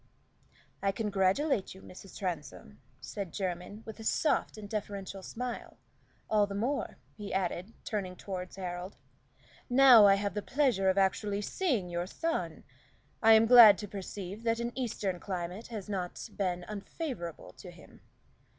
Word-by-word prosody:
"I 195 - +2
congratulate 200 +3 0
you, 190 - -14
Mrs. 185 +1 -12
Transome," 140 - -6 0.2
said 185 +7 -6
Jermyn, 185 +3 -4
with 220 0 -9
a - - -7
soft 260 +1 +1
and 210 -1 -8
deferential 200 -2 -5
smile, 245 +5 -6 0.5
"all 210 -1 +3
the 200 - -6
more," 250 +8 -2 0.2
he 205 -1 -7
added, 190 +2 -2
turning 195 -4 -3
toward 185 -1 -6
Harold, 180 0 -6 0.7
"now 245 -4 +8
I 195 - +6
have 200 0 -2
the 210 - -2
pleasure 245 -7 +2
of 190 - +1
actually 200 +1 +1
seeing 250 - -1
your 175 0 -3
son. 330 - -3 0.6
I 225 0 +7
am 220 +1 +6
glad 225 -4 +9
to 210 - -6
perceive 195 +1 -7
that 230 0 0
an 235 0 -2
Eastern 205 -7 -3
climate 180 +3 -5
has 215 -4 -7
not 185 -4 -4
been 180 -3 -1
unfavorable 210 - -6
to 185 - -9
him." 170 -3 -16
200 Hz, 150 wpm, -31 LUFS, 185-225 Hz, 0.7 s, glad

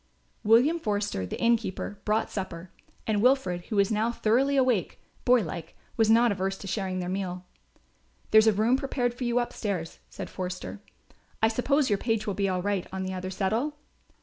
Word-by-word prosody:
William 245 +10 +4
Forster, 205 - -2
the - - -5
innkeeper, 225 -3 0
brought 215 +1 +1
supper, 185 -3 -5 0.3
and 210 -2 +1
Wilfred, 210 -9 +2
who 215 - -3
was 200 +1 +3
now 220 +2 +1
thoroughly 255 +5 +2
awake, 250 -8 +1 0.3
boylike, 210 -10 +1 0.2
was 225 -1 +3
not 230 +1 +5
averse 195 0 -2
to - - -10
sharing 190 -1 -2
their 180 -1 -3
meal. 185 -1 -3 0.9
"There's 220 0 +7
a - - +7
room 220 +6 +3
prepared 255 -3 -1
for 250 +1 -5
you 240 0 +1
upstairs," 200 -8 -2
said - - -7
Forster. 185 +2 -6 0.6
"I 220 - +6
suppose 265 +3 +1
your 200 - +2
page 225 -2 0
will 205 - -1
be 195 0 0
all 180 -1 -1
right 200 -2 -1
on 190 0 -3
the 190 0 -3
other 185 0 -4
settle?" 220 +10 -1
210 Hz, 175 wpm, -27 LUFS, 190-240 Hz, 0.9 s, There's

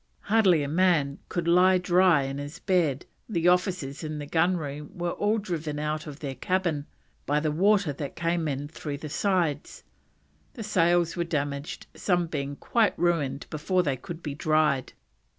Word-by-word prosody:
"Hardly 195 -8 +3
a - - -2
man 165 -3 +2
that - - -33
could 170 -1 -2
lie 180 +2 +5
dry 180 -4 +4
in 135 +1 -4
his 145 +4 -7
bed; 170 -10 +1 0.2
the 175 -5 +1
officers 180 -6 +1
in 155 -1 -4
the 145 - -5
gun 170 +4 +2
room 150 -1 -6
were 175 0 -1
all 210 +4 +1
driven 165 -7 -3
out 155 +1 -3
of 145 -1 -9
their 140 -3 -4
cabin 160 +1 -1 0.4
by 145 +1 +2
the 155 0 0
water 190 0 +3
that 140 0 -6
came 170 -1 0
in 145 0 -3
through 145 -1 -6
the 155 +1 -7
sides." 165 -3 -1 0.7
The 225 - -6
sails 175 -4 +2
were 175 - 0
damaged, 145 -3 -3
some 175 -3 +1
being 145 -3 -4
quite 225 +7 +1
ruined 150 -6 0
before 180 +4 +1
they 140 -4 0
could 165 +6 -9
be 145 - -3
dried. 155 -3 +1
160 Hz, 175 wpm, -27 LUFS, 145-180 Hz, 0.7 s, lie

